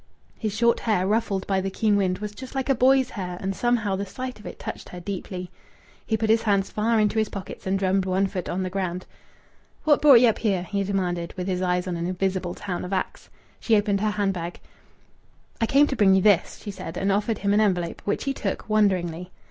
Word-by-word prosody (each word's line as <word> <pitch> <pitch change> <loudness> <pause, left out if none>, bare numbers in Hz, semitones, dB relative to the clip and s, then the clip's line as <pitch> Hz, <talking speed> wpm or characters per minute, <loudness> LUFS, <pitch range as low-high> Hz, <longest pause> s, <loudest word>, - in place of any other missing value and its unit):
His 215 -3 -2
short 235 +1 +3
hair, 210 -5 +1
ruffled 200 -2 0
by 195 -1 0
the 195 - -2
keen 210 +2 +1
wind, 185 -2 +1
was 210 +1 -5
just 260 +5 -10
like 265 0 -2
a - - +6
boy's 260 +1 +3
hair 180 -3 -5
and 195 0 -3
somehow 230 -4 +1
the 195 - -2
sight 255 +5 -6
of 210 - -10
it - - -8
touched - - -7
her 180 - -8
deeply. 180 0 -6 0.6
He 220 - +1
put 220 0 +1
his 225 0 +4
hands 200 -3 +1
far 225 +1 +1
into 215 +1 +2
his 215 - 0
pockets 195 -1 -8
and 190 +1 +1
drummed 190 0 +1
one 190 +1 +1
foot 185 -2 -4
on 185 +2 -1
the 185 - -4
ground. 185 -2 -3 0.8
"What 295 -2 +4
brought 280 -5 +8
ye 245 - +5
up 225 - +2
here?" 195 -6 0
he 200 +2 -2
demanded, 180 -3 -2
with 180 - -3
his 185 -1 -1
eyes 180 0 0
on 175 -2 -2
an 170 +1 -2
invisible 185 -1 -2
town 185 -4 -4
of 180 - -6
Axe. 185 - -3 0.3
She 225 - +2
opened 205 -1 +1
her 215 - +2
hand 205 -2 0
bag. 175 -1 -6 1.0
"I 225 - +3
came 280 +4 +5
to 275 - -2
bring 195 -4 +5
you 190 - +3
this," 205 -4 +3
she 205 - -5
said, 185 -4 -7
and 195 +1 +1
offered 210 +2 0
him 200 0 0
an 210 - +4
envelope, 180 -5 0
which 205 - -1
he 275 - -1
took, 195 -7 -4
wonderingly. 180 -5 +1
195 Hz, 235 wpm, -25 LUFS, 185-215 Hz, 1.0 s, brought